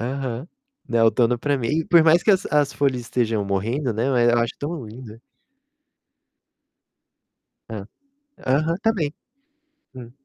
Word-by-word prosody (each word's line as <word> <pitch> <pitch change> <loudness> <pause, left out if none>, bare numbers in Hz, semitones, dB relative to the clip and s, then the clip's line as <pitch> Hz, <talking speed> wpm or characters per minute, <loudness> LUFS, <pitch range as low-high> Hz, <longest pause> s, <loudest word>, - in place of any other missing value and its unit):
Aham. 130 +2 -4 0.4
Não, 115 -1 +2
outono 120 +1 +3
pra 145 +3 0
mim 115 -2 -2
e 160 +4 0
por 170 0 +5
mais 165 +2 +5
que 215 - +3
as 190 -2 +2
as 145 -2 +1
folhas 135 -3 0
estejam 115 -3 -1
morrendo, 115 +7 -1
né, 110 +3 -1 0.3
eu 120 - +3
acho 115 0 0
tão 150 -2 -5
lindo. 115 0 -11 2.5
Hã, 105 -3 -6 0.6
aham, 155 +6 +1
também. 195 -10 0 0.8
Hum. 125 -2 -10
130 Hz, 135 wpm, -22 LUFS, 115-150 Hz, 2.5 s, por